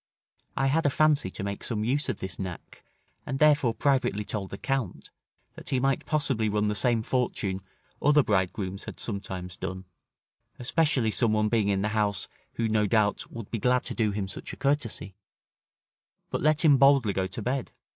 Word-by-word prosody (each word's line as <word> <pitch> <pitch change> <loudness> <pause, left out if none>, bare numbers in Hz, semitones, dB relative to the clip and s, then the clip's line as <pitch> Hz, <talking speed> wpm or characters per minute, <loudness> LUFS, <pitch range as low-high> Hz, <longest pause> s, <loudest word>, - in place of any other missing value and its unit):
I 135 - +2
had 145 +3 +2
a - - +4
fancy 150 -7 +3
to 95 - -6
make 100 0 -4
some 110 -3 -2
use 140 +6 0
of - - -1
this 95 0 -6
knack, 95 -3 -7 0.4
and 135 - -3
therefore 145 -6 +4
privately 130 -7 +1
told 100 -3 -4
the 100 - -6
Count, 135 -7 -3 0.4
that - - -8
he 130 -2 +1
might 135 +1 0
possibly 135 -8 +1
run 105 0 +1
the - - 0
same 110 +2 +1
fortune 110 -6 -1 0.4
other 150 0 +5
bridegrooms 95 -1 -1
had - - -8
sometimes 95 -4 -5
done, 95 +1 -5 0.7
especially 130 -3 +1
some 115 -1 +2
one 110 0 +2
being 110 -3 +2
in 100 -1 +1
the 105 - +1
house, 105 -2 0 0.3
who, 115 - -1
no 110 -1 +2
doubt, 105 -1 +1
would 115 -4 -8
be 115 - -2
glad 125 +3 +2
to - - -4
do 110 -2 +1
him 100 -1 -2
such 95 - -7
a - - -8
courtesy: 135 -8 -1 1.2
but - - -1
let 155 +2 +3
him 145 -3 +7
boldly 135 -7 +5
go 95 -1 0
to 100 +4 -6
bed. 130 +2 -2
110 Hz, 185 wpm, -27 LUFS, 100-135 Hz, 1.2 s, him